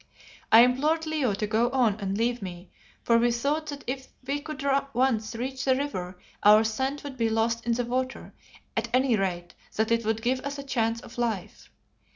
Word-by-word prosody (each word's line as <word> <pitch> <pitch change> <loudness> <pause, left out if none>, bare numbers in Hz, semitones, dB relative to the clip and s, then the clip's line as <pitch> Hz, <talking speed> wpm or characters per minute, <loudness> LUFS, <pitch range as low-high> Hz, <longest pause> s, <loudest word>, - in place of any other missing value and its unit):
I 225 - +10
implored 295 +7 +2
Leo 295 -9 0
to 210 - -2
go 225 +3 +1
on 240 -6 +2
and 195 -1 -2
leave 235 +1 0
me, 180 -1 -8 0.3
for 230 -1 +4
we 240 +1 +3
thought 285 +6 -1
that 285 -1 -6
if 260 +1 -4 0.2
we 280 +2 -1
could 290 -2 -6 0.3
once 235 -3 +1
reach 260 +3 -4
the 260 -1 +3
river 185 -11 -4 0.2
our 210 +1 +7
scent 265 +6 -2
would 280 -2 -7
be 230 -2 +1
lost 230 +1 0
in 235 - +3
the 245 +1 -1
water; 255 +2 -3 0.4
at - - -1
any 255 -2 +3
rate 180 -3 -2 0.2
that 220 +1 0
it 230 0 +2
would 220 +1 -1
give 255 +2 +1
us 280 +2 -5
a 280 - -6
chance 230 -4 -1
of 235 - -11
life. 225 -6 -3
240 Hz, 195 wpm, -27 LUFS, 220-265 Hz, 0.4 s, I